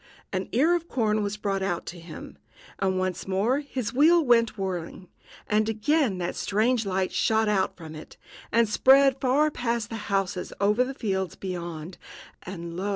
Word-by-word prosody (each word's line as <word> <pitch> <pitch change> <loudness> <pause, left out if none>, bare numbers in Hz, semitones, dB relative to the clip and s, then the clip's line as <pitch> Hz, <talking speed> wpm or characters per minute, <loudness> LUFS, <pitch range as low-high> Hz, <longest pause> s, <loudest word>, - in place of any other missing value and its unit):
An 185 0 -2
ear 300 +9 +3
of 340 -1 -3
corn 215 -6 0
was 205 0 -2
brought 195 -3 -2
to 175 - -8
him, 165 -1 -10 0.4
and 190 -1 +1
once 185 0 -2
more 205 +8 +1
his 265 -6 -4
wheel 320 +5 +5
went 230 -3 +3
whirring, 185 -1 -5 0.4
and 215 0 +1
again 230 - +1
that 175 -1 -3
strange 220 +2 +1
light 190 -1 0
shot 220 0 +2
out 195 -3 0
from 160 -3 -9
it, 155 0 -11 0.3
and 230 0 +4
spread 270 +4 +5
far 285 +4 +3
past 235 -4 -2
the 225 - -3
houses 195 -2 -1
over 210 +5 +3
the 265 +1 -5
fields 190 -6 -2
beyond; 175 -2 -6 0.4
and, 170 -2 -7
lo! 190 +3 -2
210 Hz, 165 wpm, -26 LUFS, 185-245 Hz, 0.4 s, wheel